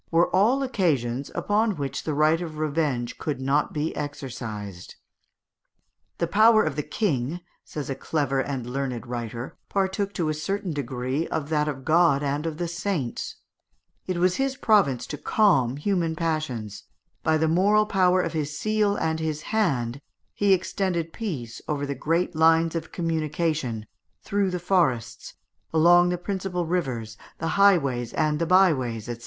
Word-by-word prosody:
were 170 Hz, +2 st, +2 dB
all 240 Hz, +8 st, +3 dB
occasions 140 Hz, -, 0 dB
upon 210 Hz, 0 st, +1 dB
which 140 Hz, -3 st, -4 dB
the 155 Hz, -, -1 dB
right 155 Hz, +3 st, +3 dB
of 160 Hz, -3 st, -6 dB
revenge 150 Hz, -6 st, -1 dB
could 145 Hz, -4 st, -3 dB
not 140 Hz, +3 st, +1 dB
be 155 Hz, +1 st, -2 dB
exercised. 115 Hz, -, -6 dB, 1.2 s
"The 170 Hz, -, +1 dB
power 215 Hz, +4 st, +5 dB
of -, -, -2 dB
the 150 Hz, -, 0 dB
King," 155 Hz, -, -1 dB, 0.2 s
says 150 Hz, -2 st, -6 dB
a 135 Hz, -, -2 dB
clever 140 Hz, -1 st, -1 dB
and 135 Hz, -3 st, -2 dB
learned 130 Hz, -2 st, -3 dB
writer, 120 Hz, 0 st, -6 dB
"partook 195 Hz, +1 st, 0 dB
to 165 Hz, -4 st, 0 dB
a -, -, +1 dB
certain 195 Hz, +3 st, -3 dB
degree 130 Hz, +2 st, -2 dB
of 155 Hz, -2 st, -3 dB
that 150 Hz, -1 st, +1 dB
of 135 Hz, -3 st, -4 dB
God 155 Hz, -3 st, +4 dB
and 145 Hz, +3 st, -1 dB
of 155 Hz, -2 st, -4 dB
the 175 Hz, 0 st, -2 dB
Saints; 170 Hz, -7 st, -3 dB, 0.7 s
it 185 Hz, -2 st, -1 dB
was 180 Hz, +1 st, +2 dB
his 270 Hz, 0 st, 0 dB
province 195 Hz, -, +3 dB
to 150 Hz, -, -6 dB
calm 140 Hz, -, +2 dB
human 170 Hz, -1 st, 0 dB
passions; 135 Hz, -11 st, -3 dB, 0.4 s
by 160 Hz, 0 st, +2 dB
the 160 Hz, +1 st, +1 dB
moral 200 Hz, +6 st, +4 dB
power 185 Hz, -3 st, +3 dB
of -, -, -3 dB
his 150 Hz, -2 st, -3 dB
seal 215 Hz, 0 st, +1 dB
and 160 Hz, -4 st, -1 dB
his 155 Hz, -1 st, -3 dB
hand 140 Hz, -, 0 dB, 0.3 s
he 205 Hz, -1 st, +2 dB
extended 180 Hz, -3 st, 0 dB
peace 135 Hz, -, -5 dB
over 145 Hz, -2 st, -2 dB
all -, -, -2 dB
the 140 Hz, -, -2 dB
great 165 Hz, +6 st, -1 dB
lines 165 Hz, +1 st, +4 dB
of 165 Hz, -1 st, -4 dB
communication, 155 Hz, -8 st, -1 dB, 0.4 s
through 200 Hz, -2 st, 0 dB
the 180 Hz, -, -2 dB
forests, 130 Hz, -, 0 dB, 0.4 s
along 175 Hz, +2 st, +5 dB
the 180 Hz, -, 0 dB
principal 180 Hz, -1 st, -3 dB
rivers, 125 Hz, -11 st, -2 dB, 0.2 s
the 165 Hz, -, -2 dB
highways 140 Hz, -, +3 dB
and 155 Hz, -1 st, +1 dB
the 170 Hz, -, 0 dB
byways, 135 Hz, -, +3 dB
&c. 120 Hz, -1 st, -5 dB
160 Hz, 160 wpm, -25 LUFS, 135-180 Hz, 1.2 s, power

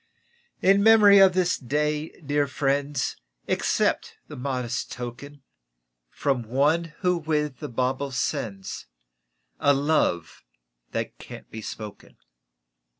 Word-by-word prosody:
In 195 Hz, +1 st, +5 dB
memory 210 Hz, -2 st, +7 dB
of 190 Hz, -1 st, +7 dB
this 180 Hz, -1 st, +1 dB
Day, 150 Hz, +4 st, -1 dB
dear 145 Hz, -1 st, 0 dB
friends, 140 Hz, 0 st, -1 dB, 0.3 s
Accept -, -, 0 dB
the -, -, -9 dB
modest 125 Hz, -2 st, -3 dB
token 130 Hz, +4 st, -8 dB, 0.7 s
From 135 Hz, -, -1 dB
one 150 Hz, +8 st, +1 dB
who 180 Hz, -2 st, +2 dB
with 150 Hz, -3 st, -1 dB
the -, -, -6 dB
bauble 130 Hz, +3 st, -1 dB
sends 105 Hz, -, -3 dB, 0.7 s
A 145 Hz, 0 st, +4 dB
love 140 Hz, -, 0 dB, 0.5 s
that -, -, -4 dB
can't -, -, -11 dB
be 110 Hz, -, -7 dB
spoken. 105 Hz, -1 st, -9 dB
140 Hz, 110 wpm, -25 LUFS, 125-160 Hz, 0.7 s, memory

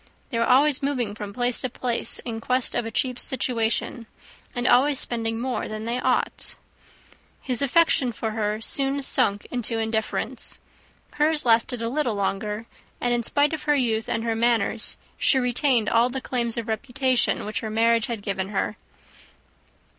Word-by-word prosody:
They 230 Hz, -, -1 dB
were 230 Hz, -, +1 dB
always 275 Hz, +2 st, +5 dB
moving 255 Hz, -7 st, -1 dB
from 210 Hz, -1 st, -7 dB
place 245 Hz, +2 st, -1 dB
to 255 Hz, -, -1 dB
place 240 Hz, 0 st, 0 dB
in 225 Hz, -2 st, -4 dB
quest 255 Hz, +1 st, +1 dB
of 240 Hz, -1 st, -1 dB
a -, -, -3 dB
cheap 250 Hz, +2 st, 0 dB
situation, 235 Hz, -2 st, 0 dB, 0.5 s
and 245 Hz, 0 st, -2 dB
always 270 Hz, +3 st, +4 dB
spending 225 Hz, -2 st, -1 dB
more 255 Hz, +1 st, -2 dB
than 215 Hz, 0 st, -6 dB
they 235 Hz, +2 st, -1 dB
ought. 255 Hz, 0 st, -1 dB, 0.8 s
His 255 Hz, -2 st, -1 dB
affection 280 Hz, -2 st, +3 dB
for 220 Hz, 0 st, -4 dB
her 215 Hz, -1 st, -1 dB
soon 275 Hz, +3 st, 0 dB
sunk 205 Hz, -7 st, +1 dB
into 240 Hz, -2 st, 0 dB
indifference: 220 Hz, 0 st, -1 dB, 0.6 s
hers 300 Hz, 0 st, +2 dB
lasted 230 Hz, 0 st, +3 dB
a -, -, 0 dB
little 245 Hz, -3 st, -1 dB
longer; 210 Hz, +2 st, -2 dB, 0.3 s
and, 245 Hz, 0 st, 0 dB
in 240 Hz, -, +1 dB
spite 285 Hz, +6 st, +1 dB
of 300 Hz, -1 st, -4 dB
her 295 Hz, -1 st, +3 dB
youth 225 Hz, -5 st, 0 dB
and 225 Hz, -, -1 dB
her 230 Hz, -1 st, -1 dB
manners, 230 Hz, -1 st, 0 dB, 0.2 s
she 270 Hz, -, +3 dB
retained 250 Hz, -2 st, +2 dB
all 235 Hz, +2 st, +3 dB
the 265 Hz, +1 st, -3 dB
claims 240 Hz, -3 st, -2 dB
to 235 Hz, -, -2 dB
reputation 250 Hz, +3 st, 0 dB
which 215 Hz, -, -2 dB
her 220 Hz, -, -5 dB
marriage 230 Hz, +1 st, +2 dB
had 230 Hz, -5 st, -5 dB
given 195 Hz, -1 st, -3 dB
her. 210 Hz, +1 st, -2 dB
235 Hz, 170 wpm, -24 LUFS, 225-255 Hz, 0.8 s, always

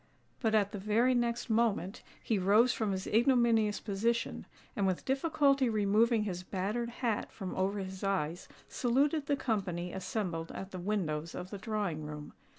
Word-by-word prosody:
But 220 Hz, -3 st, +1 dB
at 205 Hz, -2 st, +2 dB
the 205 Hz, -, -5 dB
very 220 Hz, +6 st, +3 dB
next 240 Hz, 0 st, 0 dB
moment 220 Hz, -4 st, 0 dB, 0.2 s
he 220 Hz, -3 st, +1 dB
rose 210 Hz, +6 st, +4 dB
from 215 Hz, -3 st, -1 dB
his 190 Hz, -1 st, -3 dB
ignominious 230 Hz, -3 st, +3 dB
position, 230 Hz, +3 st, -1 dB, 0.3 s
and 200 Hz, -2 st, +1 dB
with 185 Hz, -2 st, -1 dB
difficulty 275 Hz, -1 st, +2 dB
removing 215 Hz, +2 st, +3 dB
his 180 Hz, -4 st, -3 dB
battered 205 Hz, +6 st, -2 dB
hat 235 Hz, -2 st, -2 dB
from 190 Hz, -3 st, -6 dB
over 195 Hz, +2 st, 0 dB
his 190 Hz, -1 st, -6 dB
eyes, 180 Hz, -4 st, -1 dB, 0.2 s
saluted 280 Hz, +4 st, +1 dB
the 285 Hz, -, +2 dB
company 185 Hz, -8 st, -2 dB
assembled 180 Hz, -3 st, -3 dB
at 195 Hz, 0 st, -7 dB
the 185 Hz, -, -6 dB
windows 170 Hz, -5 st, -2 dB
of 180 Hz, -, -6 dB
the 200 Hz, -, -6 dB
drawing 200 Hz, -7 st, -2 dB
room. 150 Hz, 0 st, -7 dB
210 Hz, 160 wpm, -32 LUFS, 190-235 Hz, 0.3 s, rose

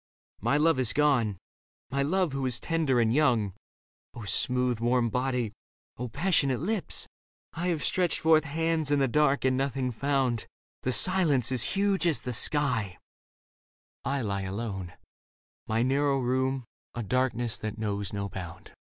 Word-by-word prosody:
My 140 Hz, -, +2 dB
love 155 Hz, -2 st, +3 dB
is 125 Hz, -4 st, +2 dB
gone, 125 Hz, -9 st, +2 dB, 0.5 s
my 140 Hz, +1 st, 0 dB
love 170 Hz, +1 st, +1 dB
who 135 Hz, -1 st, -2 dB
is 120 Hz, -2 st, -1 dB
tender 155 Hz, -7 st, +1 dB
and 115 Hz, -1 st, +2 dB
young. 120 Hz, -9 st, +2 dB, 0.7 s
smooth 125 Hz, +2 st, 0 dB
warm 120 Hz, 0 st, +1 dB
body! 125 Hz, -3 st, -1 dB, 0.5 s
O 125 Hz, -, -3 dB
passionate 140 Hz, -2 st, +1 dB
lips! 200 Hz, +4 st, -2 dB, 0.5 s
1 175 Hz, +2 st, -3 dB
have 165 Hz, -4 st, 0 dB
stretched 180 Hz, -3 st, +1 dB
forth 160 Hz, -1 st, +4 dB
hands 160 Hz, +1 st, -1 dB
in 145 Hz, -, +3 dB
the 135 Hz, -1 st, +3 dB
dark 140 Hz, +1 st, +2 dB
and 130 Hz, 0 st, +3 dB
nothing 130 Hz, -1 st, -1 dB
found: 130 Hz, -2 st, 0 dB, 0.3 s
The 130 Hz, -, -1 dB
silence 155 Hz, -, +2 dB
is 130 Hz, -3 st, +3 dB
huge 195 Hz, -2 st, +2 dB
as 160 Hz, -, +1 dB
the 125 Hz, -, -4 dB
sky 120 Hz, -, +2 dB, 0.5 s
— -, -, -86 dB
I 140 Hz, +1 st, -1 dB
lie 100 Hz, -2 st, -2 dB
alone 95 Hz, -2 st, -4 dB, 0.4 s
— -, -, -58 dB
My 110 Hz, +2 st, +1 dB
narrow 140 Hz, +2 st, +2 dB
room, 130 Hz, 0 st, 0 dB, 0.3 s
a 120 Hz, -, -3 dB
darkness 120 Hz, 0 st, 0 dB
that 110 Hz, 0 st, -5 dB
knows 100 Hz, -3 st, -3 dB
no 100 Hz, -1 st, -3 dB
bound. 90 Hz, -4 st, -8 dB
130 Hz, 155 wpm, -28 LUFS, 115-150 Hz, 0.7 s, forth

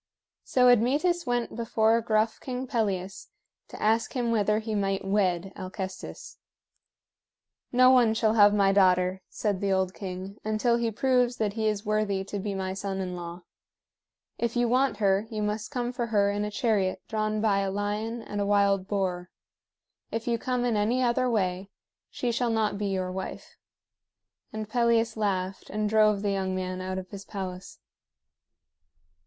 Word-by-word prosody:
So 250 Hz, -1 st, +3 dB
Admetus 285 Hz, +8 st, +3 dB
went 245 Hz, -1 st, -1 dB
before 225 Hz, 0 st, +2 dB
gruff 220 Hz, 0 st, +1 dB
King 255 Hz, 0 st, -4 dB
Pelias 200 Hz, -6 st, -2 dB, 0.4 s
to -, -, -10 dB
ask 220 Hz, +1 st, +1 dB
him 240 Hz, -3 st, 0 dB
whether 210 Hz, -1 st, +2 dB
he 220 Hz, 0 st, -3 dB
might 195 Hz, -2 st, -1 dB
wed 195 Hz, -2 st, 0 dB
Alcestis. 190 Hz, 0 st, -7 dB, 1.3 s
"No 255 Hz, +1 st, +6 dB
one 240 Hz, -4 st, +4 dB
shall 220 Hz, -1 st, +2 dB
have 205 Hz, -2 st, +7 dB
my 200 Hz, -1 st, +3 dB
daughter," 185 Hz, -1 st, +3 dB
said 205 Hz, -4 st, -2 dB
the 200 Hz, -1 st, 0 dB
old 190 Hz, -1 st, +1 dB
king, 190 Hz, +1 st, -7 dB
"until 215 Hz, +2 st, +1 dB
he 235 Hz, -1 st, 0 dB
proves 250 Hz, +1 st, +1 dB
that 210 Hz, -2 st, -1 dB
he 220 Hz, 0 st, -1 dB
is 210 Hz, -1 st, -1 dB
worthy 210 Hz, -2 st, 0 dB
to 200 Hz, +1 st, -5 dB
be 200 Hz, 0 st, -3 dB
my 190 Hz, -1 st, -3 dB
son 195 Hz, 0 st, -4 dB
in 180 Hz, -1 st, -3 dB
law. 175 Hz, 0 st, -7 dB, 1.0 s
If 235 Hz, 0 st, -1 dB
you 240 Hz, 0 st, +2 dB
want 255 Hz, -1 st, +2 dB
her, 200 Hz, 0 st, +2 dB
you 215 Hz, -2 st, -3 dB
must 210 Hz, +1 st, -2 dB
come 245 Hz, -3 st, -2 dB
for 240 Hz, -1 st, -3 dB
her 200 Hz, -2 st, +2 dB
in 205 Hz, +1 st, -1 dB
a -, -, -3 dB
chariot 210 Hz, -4 st, 0 dB
drawn 215 Hz, -1 st, -1 dB
by 210 Hz, -2 st, +2 dB
a 195 Hz, -1 st, 0 dB
lion 210 Hz, +4 st, -3 dB
and 205 Hz, 0 st, -4 dB
a -, -, 0 dB
wild 200 Hz, -2 st, +2 dB
boar. 185 Hz, -3 st, -2 dB, 0.8 s
If 225 Hz, +1 st, -4 dB
you 235 Hz, -1 st, +1 dB
come 250 Hz, 0 st, -1 dB
in 240 Hz, -2 st, +1 dB
any 230 Hz, +5 st, +1 dB
other 250 Hz, +1 st, +2 dB
way, 190 Hz, -3 st, -1 dB, 0.4 s
she 245 Hz, -, -2 dB
shall 240 Hz, +1 st, 0 dB
not 220 Hz, -3 st, 0 dB
be 205 Hz, -, -1 dB
your 185 Hz, -2 st, -2 dB
wife." 190 Hz, +1 st, -7 dB, 1.0 s
And 215 Hz, 0 st, -5 dB
Pelias 230 Hz, 0 st, +2 dB
laughed, 190 Hz, -3 st, -2 dB
and 215 Hz, +1 st, -1 dB
drove 215 Hz, -1 st, +3 dB
the 205 Hz, -, +1 dB
young 190 Hz, -1 st, -1 dB
man 185 Hz, 0 st, -3 dB
out 185 Hz, 0 st, -4 dB
of 185 Hz, -1 st, -7 dB
his 200 Hz, -1 st, -8 dB
palace. 185 Hz, -3 st, -7 dB
210 Hz, 170 wpm, -27 LUFS, 195-230 Hz, 1.3 s, have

